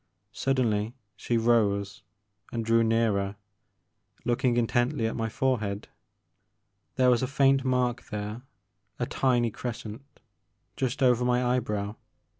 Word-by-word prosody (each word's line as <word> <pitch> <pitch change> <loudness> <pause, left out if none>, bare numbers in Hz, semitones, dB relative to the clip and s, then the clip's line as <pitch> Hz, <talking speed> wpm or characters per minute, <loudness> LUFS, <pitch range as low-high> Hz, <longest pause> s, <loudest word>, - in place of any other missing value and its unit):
Suddenly 115 -4 0 0.2
she 115 +4 -1
rose 105 -4 +1 0.5
and 115 -1 -3
drew 115 0 +4
nearer, 110 -3 +1 0.9
looking 120 0 +1
intently 120 +2 +1
at 110 - -1
my 115 -1 -2
forehead. 110 -5 -1 1.1
There 125 -1 +4
was 120 - +3
a 130 - 0
faint 135 0 +3
mark 125 -2 0
there, 105 +2 -4 0.6
a - - -1
tiny 120 -3 +1
crescent, 110 0 -6 0.7
just 130 0 -1
over 125 -1 +4
my 125 0 +2
eyebrow. 105 -4 -1
120 Hz, 115 wpm, -28 LUFS, 110-125 Hz, 1.1 s, drew